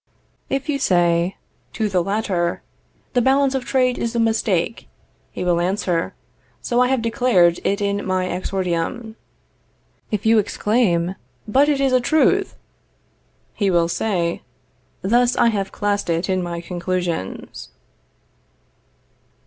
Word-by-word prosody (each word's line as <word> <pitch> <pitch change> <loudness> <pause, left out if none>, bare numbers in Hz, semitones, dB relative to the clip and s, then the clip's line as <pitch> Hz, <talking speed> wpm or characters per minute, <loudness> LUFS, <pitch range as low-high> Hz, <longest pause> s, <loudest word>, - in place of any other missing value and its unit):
If 270 0 -2
you 285 -2 -1
say 175 -4 +2 0.4
to 220 -2 -1
the 185 -3 +1
latter, 190 -3 -1 0.5
the 245 - +3
balance 270 +2 +3
of 265 -2 -2
trade 255 -2 +1
is 235 +1 -2
a - - +1
mistake, 220 -3 0 0.4
he - - -5
will 175 -1 +2
answer, 180 -2 -1 0.4
So 240 - -1
I 250 - +4
have 260 -3 0
declared 205 -7 +3
it 200 +1 0
in 200 0 -1
my 185 -1 0
exordium. 185 +4 -3 0.9
If 210 -1 -3
you 220 0 +5
exclaim, 195 -5 +1 0.3
But 275 +7 +3
it 285 -2 +1
is 270 -1 +2
a 255 - +4
truth, 315 +9 +2 1.0
he 200 -3 0
will 170 -2 +3
say, 170 -2 -1 0.6
Thus 240 +4 +3
I 235 - +4
have 200 -3 -2
classed 205 -2 -1
it 170 +3 0
in 185 -1 +1
my 170 -1 -4
conclusions. 175 - -4
200 Hz, 135 wpm, -21 LUFS, 175-240 Hz, 1.0 s, you